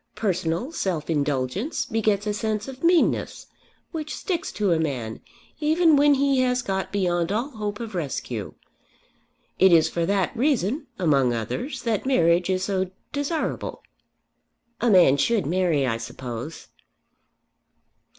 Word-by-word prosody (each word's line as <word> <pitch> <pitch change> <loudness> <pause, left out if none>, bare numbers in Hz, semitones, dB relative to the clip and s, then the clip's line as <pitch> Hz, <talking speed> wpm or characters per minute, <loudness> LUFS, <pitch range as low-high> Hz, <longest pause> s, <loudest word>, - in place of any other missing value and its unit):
Personal 185 - -1
self 175 - -2
indulgence 145 - -1
begets 215 -3 0
a 210 - 0
sense 215 +1 -2
of 265 +1 -9
meanness 340 0 +2 0.5
which 310 -2 -4
sticks 345 -4 -3
to 205 -3 0
a 165 - +3
man 125 -8 -3 0.4
even 315 +1 +4
when 290 0 +5
he 275 -1 +2
has 250 -1 +1
got 190 -1 -2
beyond 175 -3 0
all 235 +8 -1
hope 210 -3 -4
of 230 -2 -6
rescue. 130 - -4 1.0
It 190 0 +6
is 165 -2 +5
for 170 -1 -1
that 195 +2 0
reason, 270 - 0
among 140 -9 +2
others, 180 - -4
that 230 0 -1
marriage 175 -8 +3
is 185 0 0
so 190 -2 -1 0.2
desirable." 290 +3 -3 1.0
"A 240 - +3
man 175 -9 +6
should 220 +8 +1
marry, 170 -3 +1
I 115 -3 0
suppose." 120 +5 -7
195 Hz, 135 wpm, -24 LUFS, 165-255 Hz, 1.0 s, It